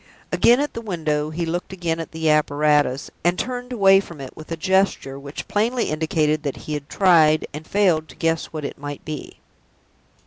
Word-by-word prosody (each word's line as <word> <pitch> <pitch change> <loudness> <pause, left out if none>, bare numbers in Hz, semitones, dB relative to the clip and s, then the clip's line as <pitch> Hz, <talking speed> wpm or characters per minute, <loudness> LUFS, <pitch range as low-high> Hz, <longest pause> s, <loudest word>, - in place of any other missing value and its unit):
Again 240 +2 +5
at 295 +1 -1
the 230 - -5
window, 155 -7 -1
he 170 +2 -3
looked 175 +3 -3
again 170 -3 -2
at 165 - -6
the 160 0 -2
apparatus, 150 -2 +2
and 175 +2 +2
turned 250 0 -4
away 195 -5 +6
from 170 -6 -9
it 135 -2 -8
with 155 +1 -11
a 165 - -2
gesture 185 -6 +1
which 140 +1 -8
plainly 230 +2 0
indicated 155 -1 +1
that 145 -3 -4
he 155 - -4
had 145 -1 -5
tried, 160 -5 +4
and 155 +2 -8
failed, 180 -6 +2
to 130 - -14
guess 165 -1 0
what 155 -2 -6
it - - -6
might 145 0 -7
be. 155 -3 -7
160 Hz, 195 wpm, -22 LUFS, 150-190 Hz, -, away